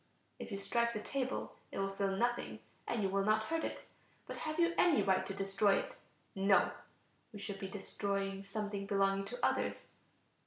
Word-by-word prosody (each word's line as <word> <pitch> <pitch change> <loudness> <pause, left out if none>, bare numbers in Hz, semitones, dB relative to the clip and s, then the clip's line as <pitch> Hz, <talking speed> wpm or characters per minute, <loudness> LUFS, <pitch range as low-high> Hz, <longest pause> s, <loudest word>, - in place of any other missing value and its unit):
If - - -6
you 200 - -2
strike 235 +4 +1
the 210 - -2
table 260 +4 -2 0.2
it - - -6
will 195 0 0
feel 195 0 0
nothing 240 +2 0 0.3
and 225 -3 0
you 195 - +2
will 195 +1 +1
not 215 +1 +3
hurt 325 +6 -1
it; - - -3 0.4
but - - -6
have 310 +1 -3
you 340 0 +4
any 345 -5 +5
right 190 -1 +3
to 195 - -3
destroy 195 +1 +3
it? - - -2 0.4
No, 195 0 +4 0.6
we 215 - -8
should 200 -1 -5
be 195 - -3
destroying 195 0 -2
something 200 0 -3
belonging 195 -1 +2
to - - -1
others. - - 0
200 Hz, 185 wpm, -35 LUFS, 195-235 Hz, 0.6 s, any